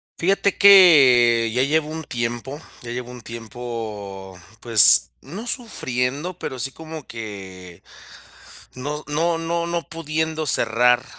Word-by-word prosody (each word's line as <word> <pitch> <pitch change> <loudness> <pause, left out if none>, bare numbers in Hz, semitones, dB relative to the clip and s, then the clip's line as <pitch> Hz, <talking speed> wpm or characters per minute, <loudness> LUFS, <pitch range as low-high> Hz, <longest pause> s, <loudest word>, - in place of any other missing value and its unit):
Fíjate 195 +3 0
que, 130 - +6
ya 125 - +1
llevo 150 +2 0
un 160 +1 -6
tiempo 120 +2 -5 0.2
ya 120 - -8
llevo 125 0 -6
un 125 - -11
tiempo, 110 -5 -8 0.2
pues, 115 -4 +6
no 190 - -9
sufriendo, 160 - -3
pero 130 - -6
sí 125 +2 -2
como 160 -1 -10
que 95 -6 -10 0.9
no 145 +4 -6
no 165 +3 -1
no 170 +1 -3
no 170 0 -3
pudiendo 160 0 -3
cerrar, 125 0 +2
130 Hz, 125 wpm, -21 LUFS, 115-160 Hz, 0.9 s, que